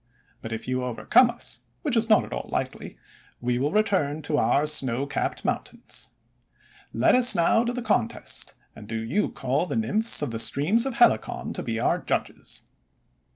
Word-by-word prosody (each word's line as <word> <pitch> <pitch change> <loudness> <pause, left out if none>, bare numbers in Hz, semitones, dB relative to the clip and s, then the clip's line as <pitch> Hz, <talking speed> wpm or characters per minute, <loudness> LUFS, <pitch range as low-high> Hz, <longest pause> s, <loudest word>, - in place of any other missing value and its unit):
But 110 - -7
if 110 0 -4
you 130 0 -1
overcome 125 - +4
us, 240 0 -2
— - - -43
which 290 -6 0
is 225 0 +1
not 215 - +5
at - - -8
all 60 - -5
likely, - - -4 0.2
— - - -29
we 120 0 +1
will 145 +3 0
return 185 -8 +1
to 150 +1 0
our 140 +6 +2
snow 135 -4 0
capped 140 - -3
mountains. - - -4 0.8
Let - - +3
us 250 0 +5
now 175 +7 +3
to 240 - 0
the 245 0 -4
contest, 205 - 0 0.2
and 105 - -11
do 110 +1 -3
you 115 - 0
call 135 +7 -1
the 145 - -3
Nymphs 150 - +2
of 140 - -2
the 115 - -4
streams 160 - +2
of 265 - -4
Helicon 240 - +2
to - - -4
be - - -3
our - - +1
judges." - - -3
150 Hz, 190 wpm, -25 LUFS, -, 0.8 s, not